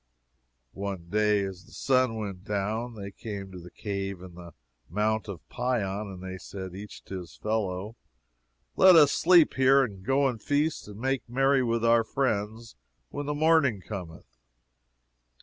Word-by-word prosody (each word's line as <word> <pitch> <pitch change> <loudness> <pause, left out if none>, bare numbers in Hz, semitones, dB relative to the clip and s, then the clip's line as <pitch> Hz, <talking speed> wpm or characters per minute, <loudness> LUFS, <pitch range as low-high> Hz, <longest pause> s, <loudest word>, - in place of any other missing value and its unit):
One 95 -4 -5
day 105 0 +2
as 95 -2 -7
the - - -20
sun 130 -3 +2
went 100 -4 -5
down, 105 +4 -2
they 100 -2 -7
came 100 -2 -7
to 90 - -9
the 90 +1 -11
cave 100 -1 -4
in 90 -2 -11
the 85 -2 -12 0.3
Mount 110 +4 0
of 95 -5 -8
Pion, 110 -5 -2
and 95 -2 -9
they 95 0 -6
said, 95 -2 -8
each 100 +2 -9
to 95 - -6
his 90 - -11
fellow, 105 -1 -2 0.8
Let 185 -2 +8
us 150 -3 +7
sleep 175 -2 +5
here, 135 +1 +5
and 100 -6 -6
go 135 +5 +2
and 120 -5 -3
feast 150 -1 0
and 105 0 -10
make 130 0 -1
merry 135 +2 +3
with 115 -2 0
our 115 0 +5
friends 110 -2 -2 0.3
when 145 0 -5
the 150 - -1
morning 155 -7 +3
cometh. 85 - -9
105 Hz, 165 wpm, -28 LUFS, 95-130 Hz, 0.8 s, Let